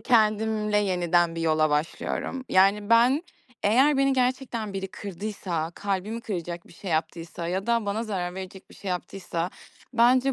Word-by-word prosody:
kendimle 215 -2 +2
yeniden 175 -3 +2
bir 165 - -4
yola 155 -1 +2
başlıyorum. 165 - -2
Yani, 200 +3 +3
ben 245 +6 +5 0.4
eğer 265 +8 +4
beni 275 0 +3
gerçekten 250 -4 -1
biri 195 0 -4
kırdıysa, 190 -4 -4
kalbimi 205 +3 -2
kıracak 175 -5 -5
bir - - -16
şey 180 +1 -7
yaptıysa 165 +1 -2
ya 190 +2 -2
da 235 -2 +1
bana 205 +3 -1
zarar 180 -4 -3
verecek 190 0 -8
bir - - -14
şey 200 - -7
yaptıysa 180 -1 -3 0.4
bence 255 +3 +4
200 Hz, 150 wpm, -26 LUFS, 175-230 Hz, 0.4 s, ben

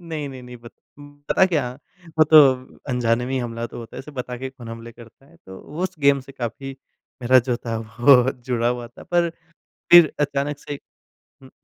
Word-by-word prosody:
नहीं, 160 -4 -5
नहीं, 130 -2 -10
नहीं 125 0 -11
पत 120 - -12 0.6
पता - - +4
क्या, 150 -9 -1 0.5
वो 155 - +7
तो 155 +1 +5 0.5
अनजाने 120 0 0
में 130 - -4
ही 135 - 0
हमला 115 -1 -4
तो 120 - -10
होता 115 -1 -10
है, - - -6
ऐसे 145 - -9
बता 125 -3 -6
के 130 +2 -5
कौन 125 -3 -12
हमले 115 0 -9
करता 120 +4 -17
है? 170 - -21
तो 95 0 -10
वो 155 +5 -6
उस 185 0 -2
गेम 140 -1 +3
से 135 +1 -14
काफ़ी 135 +2 -6 0.5
मेरा 130 +2 +5
जो 120 - +1
था 115 -1 -2 0.2
वो 125 0 +6 0.2
जुड़ा 120 -1 +1
हुआ 120 -1 -3
था 120 - -15
पर 175 -1 +3 0.6
फिर 175 -3 +9
अचानक 145 0 -1
से 145 -1 -7 0.6
हुँ। 130 - -15
130 Hz, 205 wpm, -22 LUFS, 120-145 Hz, 0.6 s, फिर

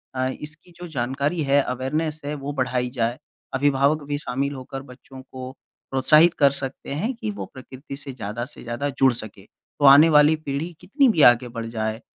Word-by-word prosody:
अ, 130 0 0
इसकी 155 +6 -8
जो 175 0 -8
जानकारी 140 +6 -1
है, 140 +1 +4
अवेयरनेस 150 +5 -2
है, 145 - -3
वो 140 0 -5
बढ़ाई 125 -2 -1
जाए। 120 -1 -1 0.4
अभिभावक 140 +2 +2
भी 145 - -1
शामिल 140 0 -2
होकर 135 0 -7
बच्चों 130 +1 -13
को 130 -1 -9 0.4
प्रोत्साहित 155 +6 +5
कर 140 -2 +5
सकते 135 0 -5
हैं 215 - -2
कि 230 -2 -5
वो - - -4
प्रकृति 130 +1 -10
से 140 -1 -7
ज्यादा 120 0 -5
से 145 - -12
ज्यादा 120 +5 -3
जुड़ 135 -1 +3
सकें। 105 -3 -9
तो 145 - -6
आने 145 +4 +8
वाले 150 +2 +6
पीढ़ी 145 +5 -3
कितनी 265 - +2
भी 165 -9 +2
आगे 120 +1 -4
बढ़ 115 -1 -6
जाए, 110 +1 -2
135 Hz, 190 wpm, -23 LUFS, 130-150 Hz, 0.4 s, आने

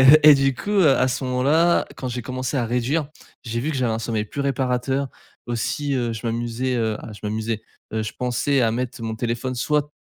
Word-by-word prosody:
et - - +7
heu 155 - +9
et 150 - +11
du 135 -1 +2
coup, 200 - -5
heu, 195 -6 +5
à 130 - +4
ce 130 +1 -2
moment 125 0 0
là, 165 +5 +4
quand 130 - -4
j'ai 125 0 -4
commencé 130 +3 -3
à 125 - +1
réduire, 125 +6 0 0.4
j'ai 115 0 -2
vu 150 - -1
que - - -3
j'avais 125 -3 +1
un 110 - -2
sommeil 110 -2 -1
plus 140 - -5
réparateur. 135 0 0 0.4
Aussi, 140 +5 -1
heu, 120 -3 0
je 110 +2 -5
m'amusais, 120 +2 -1
heu, 110 -2 0
à 110 - -8
je 105 - -12
m'amusais, 110 +1 -2 0.3
heu, 110 - 0
je 110 - -4
pensais 125 +2 +1
à 115 - +3
mettre 120 0 -3
mon 110 -1 -2
téléphone 120 +2 -2
soit 150 +4 0
125 Hz, 235 wpm, -23 LUFS, 115-135 Hz, 0.4 s, et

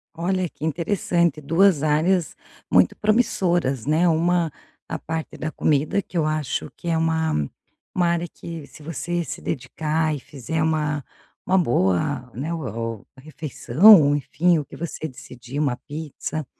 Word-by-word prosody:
Olha 185 +2 0
que 155 - -7
interessante, 170 -1 0
2 165 +1 +3
áreas 160 +3 +2 0.4
muito - - +4
promissoras, 175 - +1
né. 160 +4 +3
Uma 170 0 +2 0.4
a 160 - -2
parte 160 +1 -5
da 155 0 -3
comida, 155 +6 +1
que 180 - -7
eu 155 - +2
acho 155 -3 -2
que 170 - -9
é 165 -1 +2
uma 160 - 0 0.4
uma 175 -2 +2
área 170 0 0
que, 165 -4 -9
se 155 -2 -15
você 170 +2 -2
se - - -7
dedicar 155 +3 -1
e - - -6
fizer 150 +5 -4
uma 150 -3 0 0.4
uma 190 +1 +3
boa, 125 - +1
né, 155 +7 -3
o 115 -7 -4
refeição, 150 - +5
enfim, 165 +3 +2
o 145 - -5
que - - -12
você 160 -1 -5
decidir, 125 0 -8
uma 135 -5 +1
pizza. 155 0 -5
160 Hz, 150 wpm, -23 LUFS, 145-170 Hz, 0.4 s, refeição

